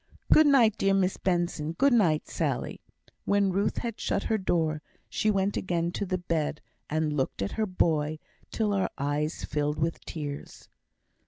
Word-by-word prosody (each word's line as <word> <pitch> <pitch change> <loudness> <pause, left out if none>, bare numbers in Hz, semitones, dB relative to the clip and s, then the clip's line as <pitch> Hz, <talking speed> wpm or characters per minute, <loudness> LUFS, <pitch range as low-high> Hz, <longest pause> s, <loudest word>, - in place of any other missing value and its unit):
"Good 310 -1 +7
night, 245 -7 +5
dear 195 0 +3
Miss 190 -1 +1
Benson. 175 -4 -1
Good 275 +8 +3
night, 170 -10 +3
Sally." - - -2 0.4
When 200 -1 +2
Ruth 200 +3 0
had 230 -3 -4
shut 200 - -1
her 220 -1 0
door, 160 -5 0 0.3
she 215 - 0
went 195 -1 +1
again 170 -2 -1
to 200 +2 -3
the 185 0 0
bed, 165 -4 -2 0.3
and 155 0 0
looked 130 -8 -1
at 100 - -3
her 220 -1 -1
boy 155 -4 +1 0.3
till 215 -2 0
her 195 -2 +1
eyes 145 +3 -2
filled 150 0 -1
with 160 +1 -2
tears. 145 -3 -7
175 Hz, 165 wpm, -28 LUFS, 155-200 Hz, 0.4 s, Good